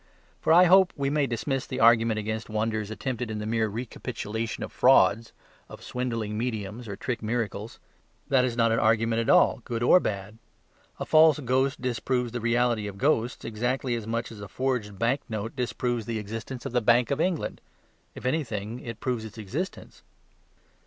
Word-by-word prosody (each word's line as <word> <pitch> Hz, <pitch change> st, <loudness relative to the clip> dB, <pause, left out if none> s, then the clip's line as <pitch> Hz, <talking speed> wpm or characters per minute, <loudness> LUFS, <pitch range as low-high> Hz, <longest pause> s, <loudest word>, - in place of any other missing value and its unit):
For -, -, +1 dB
I 175 Hz, +3 st, +8 dB
hope 185 Hz, 0 st, +6 dB
we 140 Hz, -1 st, -1 dB
may 145 Hz, -2 st, +1 dB
dismiss 130 Hz, +3 st, -2 dB
the -, -, -4 dB
argument 115 Hz, -1 st, +5 dB
against 110 Hz, +1 st, -4 dB
wonders 110 Hz, -1 st, -1 dB
attempted 120 Hz, +1 st, -4 dB
in 110 Hz, -, -4 dB
the 105 Hz, -, -4 dB
mere 110 Hz, 0 st, +1 dB
recapitulation 110 Hz, 0 st, -5 dB
of -, -, -6 dB
frauds, 115 Hz, -3 st, +4 dB, 0.4 s
of -, -, -11 dB
swindling 115 Hz, -4 st, -3 dB
mediums 110 Hz, -1 st, -4 dB
or 100 Hz, -, -5 dB
trick 120 Hz, +4 st, -4 dB
miracles. 110 Hz, -1 st, -3 dB, 0.5 s
That 130 Hz, -2 st, +3 dB
is 120 Hz, -2 st, -1 dB
not 115 Hz, -1 st, +3 dB
an 115 Hz, -, +2 dB
argument 115 Hz, +1 st, +2 dB
at 115 Hz, -, -1 dB
all, -, -, +4 dB
good 120 Hz, -1 st, -3 dB
or 180 Hz, -, +7 dB
bad. 105 Hz, -, -4 dB, 0.6 s
A -, -, -3 dB
false 155 Hz, -1 st, +6 dB
ghost 130 Hz, +2 st, 0 dB
disproves 125 Hz, 0 st, -1 dB
the 120 Hz, 0 st, -4 dB
reality 120 Hz, -2 st, +1 dB
of 100 Hz, -1 st, -7 dB
ghosts 125 Hz, -2 st, 0 dB
exactly 120 Hz, +3 st, -1 dB
as 115 Hz, -2 st, -4 dB
much 115 Hz, +1 st, -2 dB
as 105 Hz, -2 st, -10 dB
a 100 Hz, -, -7 dB
forged 115 Hz, -3 st, -2 dB
banknote 115 Hz, -1 st, -2 dB
disproves 120 Hz, -2 st, -2 dB
the 115 Hz, -1 st, -2 dB
existence 115 Hz, +4 st, -6 dB
of -, -, -3 dB
the 125 Hz, 0 st, +1 dB
Bank 120 Hz, +2 st, +3 dB
of 140 Hz, +2 st, 0 dB
England 180 Hz, -3 st, -1 dB, 0.5 s
if -, -, -10 dB
anything, 120 Hz, -5 st, -2 dB
it 115 Hz, -3 st, -8 dB
proves 125 Hz, -4 st, -2 dB
its 110 Hz, -1 st, -10 dB
existence. 125 Hz, -, -6 dB
115 Hz, 180 wpm, -27 LUFS, 110-125 Hz, 0.6 s, I